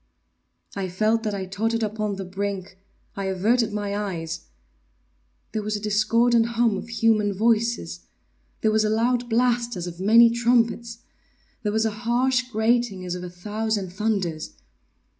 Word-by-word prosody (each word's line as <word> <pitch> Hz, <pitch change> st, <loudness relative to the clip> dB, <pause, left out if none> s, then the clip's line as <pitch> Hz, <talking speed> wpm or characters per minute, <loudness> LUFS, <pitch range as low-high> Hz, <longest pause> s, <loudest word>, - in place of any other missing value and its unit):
I 195 Hz, -2 st, -3 dB
felt 215 Hz, +5 st, +1 dB
that 210 Hz, -2 st, -2 dB
I 190 Hz, -1 st, -3 dB
tottered 225 Hz, +4 st, -1 dB
upon 215 Hz, -1 st, -2 dB
the 195 Hz, 0 st, -5 dB
brink—I 195 Hz, 0 st, -6 dB
averted 215 Hz, +5 st, +1 dB
my 205 Hz, -1 st, -3 dB
eyes— 170 Hz, -5 st, -4 dB, 1.0 s
There 215 Hz, -, -2 dB
was 210 Hz, +1 st, -2 dB
a -, -, -2 dB
discordant 225 Hz, +3 st, +3 dB
hum 230 Hz, -3 st, +3 dB
of 195 Hz, -, -6 dB
human 220 Hz, -3 st, +2 dB
voices! 215 Hz, -, 0 dB, 0.5 s
There 220 Hz, -, +3 dB
was 215 Hz, 0 st, +3 dB
a 215 Hz, -, +1 dB
loud 240 Hz, +2 st, +1 dB
blast 240 Hz, 0 st, +1 dB
as 175 Hz, -2 st, -4 dB
of 175 Hz, -1 st, -7 dB
many 230 Hz, +4 st, +6 dB
trumpets! 235 Hz, 0 st, +1 dB, 0.6 s
There 210 Hz, -, -1 dB
was 220 Hz, +1 st, +1 dB
a 220 Hz, -, +1 dB
harsh 245 Hz, +3 st, 0 dB
grating 220 Hz, -3 st, +1 dB
as 180 Hz, -, -3 dB
of 180 Hz, 0 st, -5 dB
a 180 Hz, -, -6 dB
thousand 205 Hz, +1 st, -3 dB
thunders! 190 Hz, -6 st, -2 dB
215 Hz, 150 wpm, -24 LUFS, 195-230 Hz, 1.0 s, many